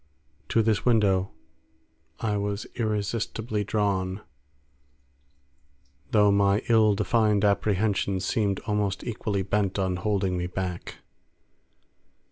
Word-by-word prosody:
To 115 - +3
this 110 -1 +1
window 100 -6 +2 0.9
I 105 -2 -1
was 100 0 -2
irresistibly 110 0 -2
drawn, 100 -2 -1 1.9
though 105 -2 +4
my 100 0 +2
ill 110 -3 +5
defined 105 -1 +2
apprehensions 100 -2 +1
seemed 100 -1 0
almost 105 -3 -1
equally 105 -4 -2
bent 100 0 0
on 95 -2 0
holding 95 -1 -1
me 90 - -2
back. 90 -1 -5
100 Hz, 95 wpm, -26 LUFS, 95-110 Hz, 1.9 s, ill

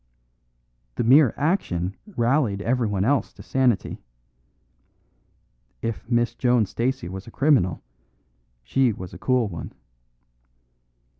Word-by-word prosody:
The - - -1
mere 130 +2 +6
action 100 - -1 0.2
rallied 120 -4 +2
everyone 110 -5 0
else 140 +3 +1
to - - -13
sanity. 130 -5 0 1.8
If 115 -1 -4
Miss 120 -1 +1
Joan 125 -3 +2
Stacey 125 +3 -2
was 95 +3 -8
a - - -10
criminal, 135 - +2 0.8
she 125 - +2
was 90 -2 -9
a - - -10
cool 125 -3 +1
one. 85 -5 -7
120 Hz, 105 wpm, -24 LUFS, 100-130 Hz, 1.8 s, mere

